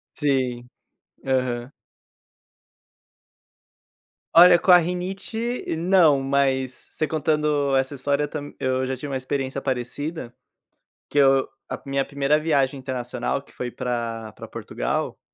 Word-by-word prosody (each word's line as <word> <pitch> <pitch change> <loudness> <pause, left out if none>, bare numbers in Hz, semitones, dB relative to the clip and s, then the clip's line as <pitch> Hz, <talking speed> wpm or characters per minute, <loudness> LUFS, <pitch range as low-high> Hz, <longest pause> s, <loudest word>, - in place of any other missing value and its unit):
Sim, 130 -4 -1 0.6
aham. 125 -2 -1 2.7
Olha, 175 +1 +9
com 180 - +3
a 180 - +10
rinite 190 +7 -3
não, 170 -4 +4
mas 135 -1 +1 0.2
você 155 - -2
contando 150 -2 +1
essa 135 +1 +1
história 140 +2 0
eu - - -1
tam 145 -1 -6
eu 130 0 0
já 130 - -2
tive 140 - -7
uma - - -2
experiência 135 +1 -3
parecida, 130 +2 -4 0.8
que - - -4
eu 135 -1 +5 0.2
a - - -5
minha 135 0 0
primeira 140 +1 +1
viagem 140 -3 +1
internacional, 125 -1 -3
que 140 - -22
foi 125 - -5
pra 115 -3 -4
pra - - -10
Portugal, - - -3
135 Hz, 125 wpm, -24 LUFS, 130-150 Hz, 2.7 s, a